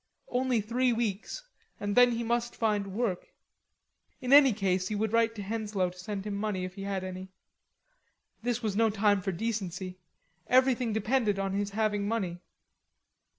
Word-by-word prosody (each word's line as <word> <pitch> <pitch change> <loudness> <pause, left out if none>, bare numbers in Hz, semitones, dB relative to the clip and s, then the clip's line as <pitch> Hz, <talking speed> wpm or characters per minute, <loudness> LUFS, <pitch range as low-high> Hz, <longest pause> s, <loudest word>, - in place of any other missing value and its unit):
Only 250 -2 +1
three 245 +4 +1
weeks; 225 - -2 0.4
and 205 0 -2
then 245 -1 +6
he 235 0 -2
must 235 +1 -1
find 210 -3 0
work. 220 -6 -1 0.9
In 255 +1 +1
any 280 -2 +9
case 190 -3 0
he 215 - -2
would 215 +1 -1
write 230 -1 +2
Henslowe 205 -3 -2
to 180 - -16
send 195 +1 -5
him 210 - -3
money 200 -2 -2
if 185 - -7
he 195 - -9
had 195 -1 -2
any; 185 0 -6 1.1
this 240 0 -1
was 210 -3 -1
no 225 +1 +4
time 205 -1 +2
for 190 - -2
delicacy; 185 -2 -4 0.5
everything 255 -2 +3
depended 220 -1 +1
on 195 -1 -1
his 200 0 -1
having 205 -1 0
money. 190 -6 -2
210 Hz, 160 wpm, -29 LUFS, 195-230 Hz, 1.1 s, any